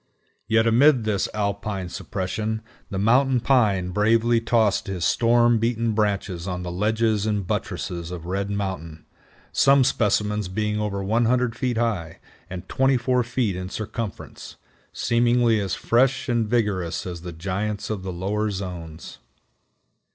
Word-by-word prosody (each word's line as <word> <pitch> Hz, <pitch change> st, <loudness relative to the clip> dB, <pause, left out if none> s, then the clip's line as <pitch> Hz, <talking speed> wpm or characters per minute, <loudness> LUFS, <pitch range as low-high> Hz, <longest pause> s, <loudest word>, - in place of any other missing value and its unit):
Yet 115 Hz, 0 st, +3 dB
amid 125 Hz, +2 st, +5 dB
this 105 Hz, -2 st, 0 dB
alpine 100 Hz, -2 st, -2 dB
suppression 110 Hz, +5 st, -3 dB, 0.3 s
the 100 Hz, -, -4 dB
Mountain 125 Hz, +5 st, +3 dB
Pine 105 Hz, -9 st, +2 dB
bravely 115 Hz, +4 st, +3 dB
tossed 115 Hz, -1 st, +1 dB
his 90 Hz, -4 st, -2 dB
storm 120 Hz, 0 st, +3 dB
beaten 115 Hz, 0 st, 0 dB
branches 100 Hz, -4 st, -1 dB
on 90 Hz, -1 st, -3 dB
the 90 Hz, -, -4 dB
ledges 110 Hz, +2 st, +1 dB
and 105 Hz, -3 st, -1 dB
buttresses 85 Hz, -1 st, -3 dB
of 90 Hz, -2 st, -7 dB
Red 100 Hz, +2 st, -2 dB
Mountain, 95 Hz, -6 st, -4 dB, 0.5 s
some 135 Hz, 0 st, +5 dB
specimens 105 Hz, -5 st, +1 dB
being 105 Hz, +2 st, -2 dB
over 100 Hz, -2 st, -2 dB
100 120 Hz, +3 st, +1 dB
feet 125 Hz, -1 st, -1 dB
high, 105 Hz, -9 st, -1 dB, 0.3 s
and 90 Hz, -1 st, -7 dB
24 130 Hz, -1 st, +2 dB
feet 120 Hz, -4 st, -1 dB
in 90 Hz, 0 st, -5 dB
circumference, 110 Hz, 0 st, -6 dB, 0.4 s
seemingly 120 Hz, -1 st, +2 dB
as 95 Hz, -2 st, -2 dB
fresh 130 Hz, +3 st, +2 dB
and 120 Hz, -3 st, +1 dB
vigorous 105 Hz, -7 st, -1 dB
as 90 Hz, -2 st, -6 dB
the 90 Hz, 0 st, -7 dB
giants 100 Hz, +6 st, -3 dB
of 105 Hz, -3 st, -3 dB
the 95 Hz, 0 st, -5 dB
lower 100 Hz, +5 st, -1 dB
zones. 90 Hz, -5 st, -7 dB
105 Hz, 135 wpm, -24 LUFS, 95-115 Hz, 0.5 s, amid